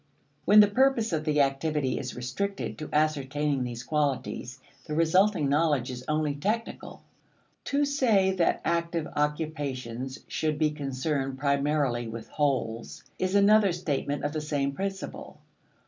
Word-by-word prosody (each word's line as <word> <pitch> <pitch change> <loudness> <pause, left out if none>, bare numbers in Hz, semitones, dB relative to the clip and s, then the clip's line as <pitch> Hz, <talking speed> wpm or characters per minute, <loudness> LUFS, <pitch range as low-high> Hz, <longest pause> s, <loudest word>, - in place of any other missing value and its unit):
When 210 +2 +8
the 205 - +6
purpose 230 -2 +2
of 155 -1 -1
the 150 -2 +3
activity 140 0 0
is 130 -2 -5
restricted 130 +12 -3
to 155 - -6
ascertaining 145 -2 0
these 120 -1 -5
qualities, 140 -4 -2 0.3
the 150 - -3
resulting 165 0 +3
knowledge 145 -3 +1
is 125 0 -7
only 150 -1 0
technical. 210 +11 -4 0.6
To 285 +1 +1
say 230 -9 +3
that 180 -3 +1
active 170 -1 0
occupations 140 -5 -2
should 155 -1 -1
be 155 -1 +2
concerned 135 -1 -2
primarily 140 -3 +1
with 115 0 -7
wholes 130 -6 -2 0.2
is 185 +1 0
another 200 0 +5
statement 145 -4 -2
of 145 +1 -1
the 155 - -2
same 145 -2 -1
principle. 195 +6 -5
150 Hz, 135 wpm, -28 LUFS, 135-175 Hz, 0.6 s, When